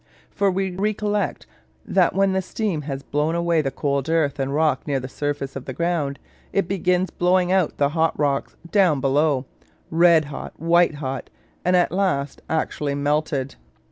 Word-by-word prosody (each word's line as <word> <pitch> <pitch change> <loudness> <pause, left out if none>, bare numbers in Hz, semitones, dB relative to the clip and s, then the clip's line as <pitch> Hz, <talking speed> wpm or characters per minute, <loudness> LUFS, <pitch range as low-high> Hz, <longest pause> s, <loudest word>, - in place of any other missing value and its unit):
For 200 0 +1
recollect, 200 +2 -1 0.4
that 180 -3 +2
when 195 0 +3
the 190 - +1
steam 190 -3 -2
has 135 0 -4
blown 150 +3 0
away 170 -1 +2
the 135 - -1
cold 140 +1 -2
earth 155 -3 +1
and 135 0 -1
rock 150 -2 +1
near 140 -2 0
the 130 - -6
surface 145 0 -3
of 135 - -6
the 130 - -5
ground, 165 -3 -1 0.3
it 195 -3 +1
begins 180 -1 +1
blowing 180 0 +2
out 190 -4 +1
the 140 -1 +2
hot 160 +1 +1
rocks 140 -2 0 0.2
down 185 -8 +4
below, 140 0 +2 0.5
red 165 -1 +5
hot, 145 -1 -8
white 170 -1 +3
hot, 135 -2 -5 0.3
and 180 +1 +3
at 180 - +3
last 180 -7 -1
actually 150 -2 -1
melted. 145 -1 -1
160 Hz, 165 wpm, -23 LUFS, 140-180 Hz, 0.5 s, red